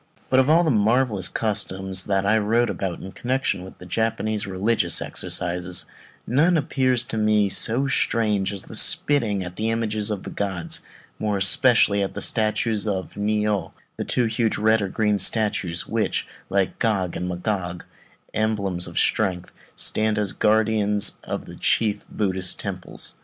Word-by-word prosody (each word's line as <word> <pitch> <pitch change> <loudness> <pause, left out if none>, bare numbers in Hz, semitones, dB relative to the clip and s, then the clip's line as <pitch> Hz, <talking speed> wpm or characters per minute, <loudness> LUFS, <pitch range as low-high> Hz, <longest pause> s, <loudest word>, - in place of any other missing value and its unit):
But 130 - +4
of 130 +2 +2
all 165 +3 +5
the 160 - +1
marvellous 110 -3 +2
customs 95 -3 +1
that 95 -1 0
I 110 +2 +3
wot 115 +3 +1
of - - -9
in 95 0 -4
connection 130 -6 -2
with 90 -1 -12
Japanese 110 0 -2
religious 95 -2 +1
exercises, 90 0 0 0.4
none 165 +7 +2
appears 130 -4 0
to 110 -2 -5
me 105 -1 +2
so 120 +7 +3
strange 105 -6 0
as 100 -2 -4
that - - -14
of - - -1
spitting 110 -10 +3
at 90 0 -9
the 110 +1 -1
images 110 -2 -1
of 105 -3 -4
the - - -8
gods, 95 -4 -1 0.4
more 105 -2 -1
especially 100 +1 +4
at 100 - -3
the - - -4
statues 110 0 +1
of 95 -3 -3
the - - -11
Ni 105 +1 0
ô, 105 -2 -2 0.2
the - - -3
two 125 - 0
huge 110 0 -1
red 110 +1 +2
or - - -1
red - - -5
and - - -13
green 105 -2 +1
statues 95 -4 +1
which, - - -2 0.2
like 95 -1 -1
Gog 100 -6 0
and 90 - -4
Magog, 90 -1 -4 0.5
emblems 100 -5 -1
of - - -9
strength, 90 -4 0 0.2
stand 110 0 +1
as 105 -2 0
guardians 105 -1 +2
of - - -5
the - - -11
chief 110 -3 -1
Buddhist 95 -3 0
temples. - - -3
105 Hz, 170 wpm, -23 LUFS, 95-110 Hz, 0.5 s, all